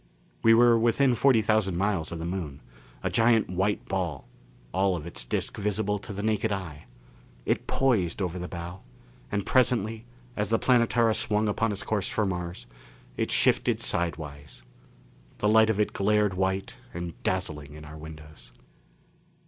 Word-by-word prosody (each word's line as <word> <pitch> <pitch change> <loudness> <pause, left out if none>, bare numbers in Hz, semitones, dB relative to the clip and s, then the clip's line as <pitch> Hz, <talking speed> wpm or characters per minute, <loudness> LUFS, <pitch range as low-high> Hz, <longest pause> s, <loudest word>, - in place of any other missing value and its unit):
We 115 0 +6
were 120 0 +6
within 120 +3 +3
forty 120 -2 +4
thousand 105 -4 +1
miles 95 -4 0
of 85 - -4
the 80 - -5
Moon. 85 -6 -4 0.4
A - - -1
giant 115 -4 +3
white 95 +3 0
ball 85 -10 -3 0.5
all 95 -1 +2
of 80 -3 -6
its 85 - -3
disc - - -2
visible 105 0 -1
to 105 - -9
the 100 0 -5
naked 110 0 0
eye. 85 -7 -5 0.6
It - - -1
poised 110 -11 +1
over 90 -2 -2
the 90 - -5
bow, 85 +1 -7 0.5
and 100 -1 -1
presently, 115 -3 +1 0.3
as 105 -1 -1
the 115 - +3
Planetara 115 -2 +3
swung 105 0 0
upon 110 +2 0
its 100 - -4
course 105 -3 -1
for 110 - 0
Mars, 90 -2 -4 0.5
it - - -1
shifted - - +2
sidewise. 75 -4 -3 0.7
The 105 - 0
light 110 +1 +5
of 110 -2 0
it 105 - +1
glared 105 0 +2
white 95 +1 -2 0.2
and 85 -1 -4
dazzling 75 -6 -3
in 75 0 -10
our 75 +1 -10
windows. 75 -1 -12
95 Hz, 160 wpm, -27 LUFS, 85-110 Hz, 0.7 s, We